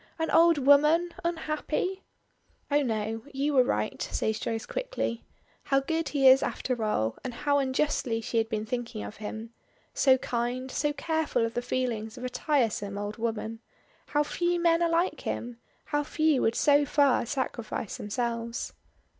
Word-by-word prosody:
An 320 0 -1
old 335 0 +6
woman 300 +5 +5
unhappy 340 +3 -2 0.4
" - - -36
"Oh 290 +1 +4
no. 225 -3 -2
You 280 +2 -1
were 260 -2 +6
right," 105 - -2
says 220 0 -1
Joyce 225 0 -3
quickly. - - -3 0.4
How 275 -1 +3
good 320 +2 -2
he 275 -2 +3
is 260 +1 +8
after 245 -3 -2
all, 110 - 0
and 255 - -3
how 285 +4 +1
unjustly 260 -3 0
she 230 +1 -1
had 225 0 -1
been 215 -2 -2
thinking 240 -1 -4
of 210 - -8
him. 220 +2 -6 0.4
So 265 -2 +5
kind, 250 +1 -3
so 295 - 0
careful 315 -5 0
of 230 - -4
the 245 - -1
feelings 240 -3 -2
of 245 - -8
a - - -2
tiresome 235 -7 0
old 205 +2 -4
woman. 225 -1 -3 0.5
How 295 0 +2
few 345 +3 0
men 335 0 +3
are 340 - +3
like 335 +3 +1
him. 235 0 -4 0.3
How 295 - 0
few 310 -2 +2
would 225 - +2
so 290 0 +4
far 285 -1 +3
sacrifice 235 -5 -3
themselves. 230 +2 -3
255 Hz, 165 wpm, -28 LUFS, 225-300 Hz, 0.5 s, is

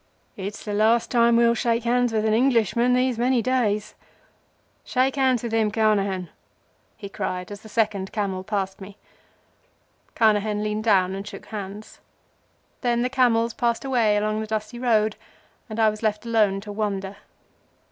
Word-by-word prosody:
"It's 200 +1 -7
the 210 - -3
last 220 +3 +2
time 235 -1 +4
we'll 235 0 +4
shake 235 0 0
hands 245 0 +1
with 220 -1 0
an 215 - +2
Englishman 235 0 +2
these 250 -2 +1
many 245 -1 +2
days. 215 -5 0 0.9
Shake 260 +2 0
hands 260 -4 +2
with 235 - -3
him, 225 -1 +2
Carnehan," 200 -4 0 0.7
he 210 -3 -8
cried, 180 -1 -4
as 205 - -8
the 220 - -13
second 205 -3 -1
camel 195 -3 -2
passed 195 -1 -3
me. 195 +1 -11 1.2
Carnehan 210 -1 +2
leaned 215 +1 -2
down 190 -4 +3
and 195 +1 -6
shook - - -9
hands. 205 0 -8 0.8
Then 240 -1 +1
the 250 - 0
camels 235 -3 +2
passed 235 +2 -1
away 230 -6 +2
along 215 +1 -1
the 220 - -5
dusty 215 +2 -4
road, 220 -3 +1 0.5
and 215 +1 -5
I 220 -1 +4
was 215 - -9
left 215 0 -1
alone 210 -4 +2
to 205 0 -8
wonder. 200 -2 -3
215 Hz, 160 wpm, -24 LUFS, 205-235 Hz, 1.2 s, time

